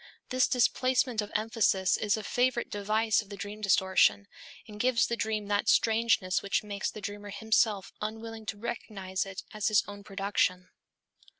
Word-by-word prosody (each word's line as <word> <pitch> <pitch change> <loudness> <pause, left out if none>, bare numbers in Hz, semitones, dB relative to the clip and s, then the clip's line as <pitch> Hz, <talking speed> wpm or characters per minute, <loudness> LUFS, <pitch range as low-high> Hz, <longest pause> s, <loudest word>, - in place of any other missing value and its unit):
This 255 -1 +3
displacement 255 -1 +2
of 205 - -7
emphasis 215 -4 +2
is 210 0 0
a 215 - -5
favorite 245 +2 0
device 215 +2 +1
of 205 - -15
the 200 - -7
dream 205 +2 -7
distortion 195 0 +3 0.4
and 210 -1 -10
gives 245 0 +3
the 235 - -1
dream 215 -2 -2
that 205 0 +1
strangeness 220 -5 +3
which 200 - 0
makes 205 -1 -3
the 215 - -9
dreamer 205 +1 -6
himself 210 -1 +1
unwilling 220 +1 -6
to 205 - -4
recognize 200 -4 -4
it 195 -1 -7
as 210 -2 -1
his 215 -2 +4
own 205 0 -9
production. 195 -2 -1
210 Hz, 165 wpm, -29 LUFS, 200-225 Hz, 0.4 s, his